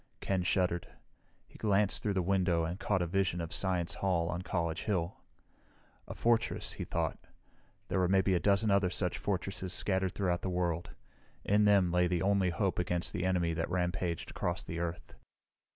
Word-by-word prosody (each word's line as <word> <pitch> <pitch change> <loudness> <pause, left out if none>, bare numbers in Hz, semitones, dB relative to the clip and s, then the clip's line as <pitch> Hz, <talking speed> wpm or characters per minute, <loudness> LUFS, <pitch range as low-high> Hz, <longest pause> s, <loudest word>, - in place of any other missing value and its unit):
Ken 95 -2 0
shuddered. 90 -1 0 0.6
He - - -17
glanced 105 -2 +2
through 105 -2 -1
the 95 - +1
window 90 -2 +2
and 85 +4 -3
caught 95 -5 +1
a - - 0
vision 90 0 0
of 85 -1 -4
Science 90 -3 +1
Hall 85 -3 0
on 90 0 -2
College 85 -3 -2
Hill. 90 -4 -1 0.9
A - - -7
fortress, 115 -1 +1
he - - -5
thought. - - -2 0.7
There 95 - 0
were 90 - +3
maybe 95 +1 +3
a 90 - +3
dozen 100 +3 +3
other 100 -2 +3
such 90 0 0
fortresses 95 -2 -2
scattered 95 -2 0
throughout 90 -3 0
the 95 - -2
world; 85 -2 -1 0.6
in 105 +1 +4
them 100 -4 +4
lay 90 0 +3
the 85 -2 0
only 100 -2 +3
hope 95 +1 -1
against 90 0 -1
the 90 - -2
enemy 90 -3 +1
that 80 0 -2
rampaged 90 -1 -2
across - - -2
the 80 - -5
Earth. 85 0 -4
90 Hz, 180 wpm, -32 LUFS, 85-95 Hz, 0.9 s, in